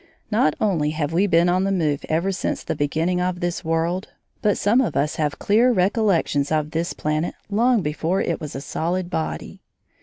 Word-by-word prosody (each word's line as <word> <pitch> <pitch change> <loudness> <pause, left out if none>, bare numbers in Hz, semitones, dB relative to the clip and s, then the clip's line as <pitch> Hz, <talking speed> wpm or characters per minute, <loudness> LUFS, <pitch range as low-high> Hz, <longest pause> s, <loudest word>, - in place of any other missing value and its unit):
Not 210 -8 +3
only 170 -8 +1
have 150 0 -1
we 190 +5 +3
been 170 -1 +4
on 180 +1 +2
the 195 - 0
move 155 -7 0
ever 170 +5 +1
since 190 - -2
the - - -3
beginning 165 +5 0
of 180 0 -1
this 175 0 -2
world, 165 +3 -1 0.3
but 205 -1 +2
some 225 +6 +3
of 255 - -1
us 150 +2 0
have 150 -2 -1
clear 230 +5 +3
recollections 185 - +1
of 155 -1 0
this 165 +1 -2
planet 155 +2 -2 0.2
long 230 0 +3
before 160 +5 -1
it 170 - -1
was 150 -2 -6
a 135 - -4
solid 175 +5 -2
body. 160 -3 -4
175 Hz, 190 wpm, -22 LUFS, 155-195 Hz, 0.3 s, been